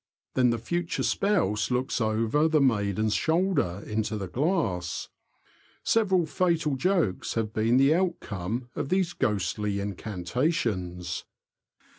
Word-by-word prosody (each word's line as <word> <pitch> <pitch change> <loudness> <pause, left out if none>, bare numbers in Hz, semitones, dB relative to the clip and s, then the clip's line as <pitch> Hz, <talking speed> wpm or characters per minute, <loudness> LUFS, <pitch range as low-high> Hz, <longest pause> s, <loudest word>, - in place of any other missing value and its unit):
Then 125 -1 +4
the 120 - +1
future 170 +9 -2
spouse 170 - +1
looks 125 0 0
over 115 +7 +2
the 160 -1 +3
maiden's 110 -5 +2
shoulder 160 - +1
into 110 0 -2
the 95 -2 -4
glass. 110 - -1 0.7
Several 190 -6 +3
fatal 165 -3 +1
jokes 170 - 0
have 110 -2 -1
been 115 +3 +2
the 135 +3 +5
outcome 120 - -2
of - - -3
these 185 -2 +1
ghostly 105 - -1
incantations. 95 - -2
120 Hz, 115 wpm, -27 LUFS, 100-165 Hz, 0.7 s, the